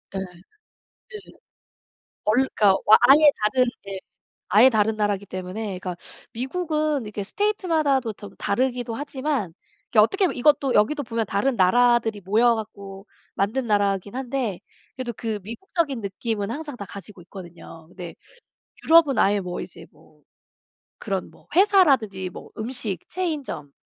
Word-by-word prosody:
예. - - -1
네. - - -3 2.0
원 210 - +3 0.2
그러니까 200 -2 +5 0.3
아예 295 +2 +8
다른 250 +5 +2 0.2
예 195 -1 -5 0.6
아예 225 +5 +8
다른 220 -1 +1
나라기 205 -2 -1
때문에 185 +4 -6
그니까 180 -1 -5 0.4
미국은 305 +2 -2
이렇게 210 0 -6
state 410 - -2
마다도 275 -7 +1
텀 200 -1 -12
다르기도 245 +1 -1
하지만 275 - -3 0.4
이 - - +3
어떻게 380 - +4
하면 365 - 0
이것도 275 0 +3
여기도 260 +8 +2
보면 230 -3 -2
다른 205 +8 0
나라들이 225 +2 +3
모여 225 +6 +3
갖고 200 -2 -8 0.3
만든 225 +6 -1
나라긴 200 -1 0
한데 250 -7 -3 0.4
그래도 255 -2 -4
그 220 -2 -3
미국적인 275 - -3
느낌은 205 +1 -3
항상 290 +1 -6
다 200 - -7
가지고 200 0 -11
있거든요. 175 -2 -12
근데 175 -1 -9 0.7
유럽은 320 -4 +5
아예 200 +1 +3
뭐 180 -1 -5
이제 - - -10
뭐 - - -24 0.8
그런 195 -4 -3
뭐 - - -22
회사라든지 275 - +3
뭐 - - -11
음식, 220 -5 -3
체인점 300 - -4
225 Hz, 310 characters per minute, -23 LUFS, 200-270 Hz, 2.0 s, 아예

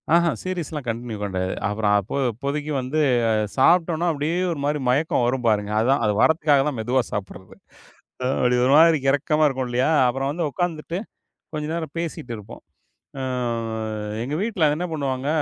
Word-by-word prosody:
ஆஹா, 170 0 +5
சீரிஸ்ல்லாம் 165 -6 -4
continue 115 -1 -4
கெடையாது. 95 -2 -2
அப்புறம் 105 0 +1
அப்போ 100 - -6 0.2
அப்போதைக்கு 140 +6 -4
வந்து, 135 +5 -1 0.5
சாப்ட்டோம்ன்னா 170 +4 +3
அப்டியே 155 +3 -1
ஒரு 160 - -4
மாரி 150 +1 0
மயக்கம் 140 0 +2
வரும் 125 0 -1
பாருங்க. 105 -1 +1
அதான், 130 +5 +2
அது 105 - +2
வர்றதுக்காகதான் 150 -3 +3
மெதுவா 125 +4 +1
சாப்பிடுறது. 95 -2 -6 0.9
அப்டி 125 0 +3
ஒரு 130 - +3
மாரி 165 0 +6
கெரக்கமா 150 +3 +2
இருக்கும் 130 -2 -2
இல்லையா? 125 +4 +1 0.2
அப்புறம் 135 +2 -1
வந்து 165 +2 -2
உக்காந்துட்டு, 165 +2 -3 0.6
கொஞ்ச 150 -1 -3
நேரம் 160 -3 -4
பேசிட்டு 160 -7 -4
இருப்போம். 105 -1 -11 0.6
அ - - -2 1.0
எங்க 135 +5 -3
வீட்டுல 205 -8 +1
என்ன 175 - -3
பண்ணுவாங்க? 135 -3 -2
140 Hz, 150 wpm, -23 LUFS, 120-160 Hz, 1.0 s, மாரி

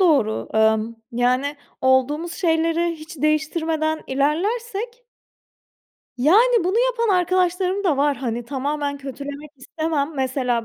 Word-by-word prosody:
doğru. 285 - +2
Imm, 220 +1 +2 0.2
yani, 255 +4 +1 0.2
olduğumuz 280 +6 +2
şeyleri 335 0 +1
hiç 315 +2 -11
değiştirmeden 315 +1 0
ilerlersek 425 - -1 1.1
Yani, 435 - +4
bunu 370 +2 0
yapan 465 -2 0
arkadaşlarım 365 +2 +1
da 310 -7 +2
var, 285 0 +2
hani, 240 -2 -3
tamamen 285 +2 -2
kötülemek 280 +2 -7
istemem. 315 +2 -2
Mesela 255 -3 -1
305 Hz, 105 wpm, -22 LUFS, 265-350 Hz, 1.1 s, Yani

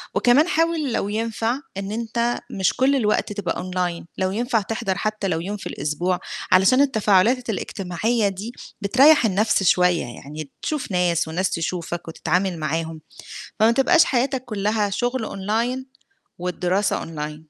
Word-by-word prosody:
وكمان 275 +7 +4
حاول 325 -6 +1
لو 200 - -1
ينفع 225 +3 -1 0.2
إن 195 +1 -4
أنت 235 +1 -1
مش 190 -2 +1
كل 270 +2 +2
الوقت 210 -3 +1
تبقى 190 -5 -3
أونلاين 180 -2 -3
لو 185 0 0
ينفع 230 +1 0
تحضَر 195 -2 -2
حتى 215 -1 -2
لو 165 -3 0
يوم 205 +4 -4
في - - -7
الأسبوع 175 +5 -2 0.3
علشان 190 +9 +5
التفاعلات 230 -1 +3
الإجتماعية 205 +3 -1
دي 200 +5 -6 0.3
بتريّح 265 +6 +5
النَفْس 205 0 +2
شوية، 180 -4 +3
يعني 140 +4 -8
تشوف 300 -9 -3
ناس 175 -2 +1
والناس 180 +4 -1
تشوفك 170 0 -3
وتتعامل 175 +2 -1
معاهم، 160 +1 -3 0.6
فما 225 +2 +6
تبقاش 320 +7 +5
حياتك 260 0 0
كلّها 210 -2 -1
شُغل 245 +3 -1
أونلاين 230 +7 -2 0.5
والدراسة 180 +3 0
أونلاين. 150 -1 -5
205 Hz, 140 wpm, -22 LUFS, 180-240 Hz, 0.6 s, فما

